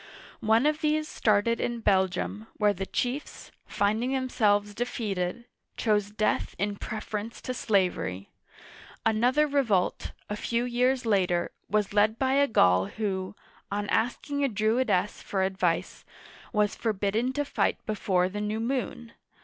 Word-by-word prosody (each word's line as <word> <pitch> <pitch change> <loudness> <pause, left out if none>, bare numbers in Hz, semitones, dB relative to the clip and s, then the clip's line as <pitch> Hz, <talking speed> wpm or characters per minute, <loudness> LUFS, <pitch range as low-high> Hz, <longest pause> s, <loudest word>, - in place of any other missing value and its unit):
One 225 +4 +3
of 300 0 +1
these 305 0 +1
started 225 0 +1
in 240 -1 -2
Belgium, 190 +2 +1
where 210 -1 +3
the 195 0 -5
chiefs, 255 +4 -3 0.2
finding 215 +5 0
themselves 210 -6 +1
defeated, 210 -2 -3 0.3
chose 210 -2 +1
death 215 +1 -1
in 205 0 -1
preference 215 +1 -5
to 255 - -3
slavery. 180 - 0 0.7
Another 245 +7 +3
revolt, 255 -11 0
a 210 - -3
few 235 +3 -1
years 250 +1 +1
later, 180 -5 +1 0.2
was 210 -1 +1
led 215 +2 +3
by 265 +1 +1
a 280 +1 +4
Gaul 90 - +4
who, 190 - -3 0.4
on 205 0 -2
asking 285 +5 0
a 275 - +2
Druidess 215 -2 +1
for 190 -1 -1
advice, 190 -3 -1 0.5
was 210 -1 +2
forbidden 215 +3 0
to 290 +2 -1
fight - - 0
before 190 -4 +1
the 205 +2 -5
new 210 +1 -2
moon. 240 -1 -3
215 Hz, 135 wpm, -28 LUFS, 200-245 Hz, 0.7 s, a